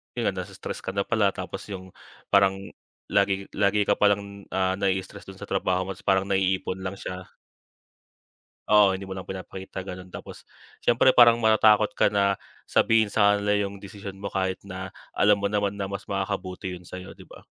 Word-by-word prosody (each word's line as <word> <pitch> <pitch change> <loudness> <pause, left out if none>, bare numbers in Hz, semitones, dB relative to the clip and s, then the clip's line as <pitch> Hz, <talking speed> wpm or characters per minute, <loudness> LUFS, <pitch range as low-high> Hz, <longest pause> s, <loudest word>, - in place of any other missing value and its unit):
'yun 120 - -2
nga - - +2
nasi-stress 95 +1 -6
ka 95 - -6
na 100 - +1
pala, 105 -4 +1
tapos - - -6
'yung 95 -2 -8 0.4
parang 100 -1 +5 0.6
lagi 100 0 +2
lagi 105 +1 +2
ka 100 - +1
palang, 100 -1 +1
ah, 95 0 +1
nai-stress 95 +1 -2
dun 95 - -9
sa 105 - -9
trabaho 95 -1 +1
mo, 95 - -5
tapos 95 - -12
parang 95 0 +4
naiipon 95 -1 0
lang 95 +1 -4
siya. 90 -1 -7 1.4
Oo, 105 -2 +6
hindi 95 - -6
mo 95 - -8
lang 95 - -7
pinapakita 95 0 -7
ganun. 90 -1 -8
Tapos, - - -10 0.3
siyempre 120 +2 +4
parang 120 -2 +6
matatakot 110 -1 +5
ka - - +5
na 100 -1 +2 0.3
sabihin 110 -2 +3
sa 105 0 +4
kanila 105 0 +1
'yung 100 -1 -4
desisyon 100 0 -8
mo - - -3
kahit 95 -1 -2
na 95 -1 -7 0.2
alam 100 0 +3
mo 100 - +1
naman 100 -1 0
na 100 -1 -4
mas 100 - -6
makakabuti 95 -1 -3
'yun 90 - -14
sa'yo 90 +1 -8
'di - - -14
ba. - - -14
100 Hz, 185 wpm, -26 LUFS, 95-100 Hz, 1.4 s, Oo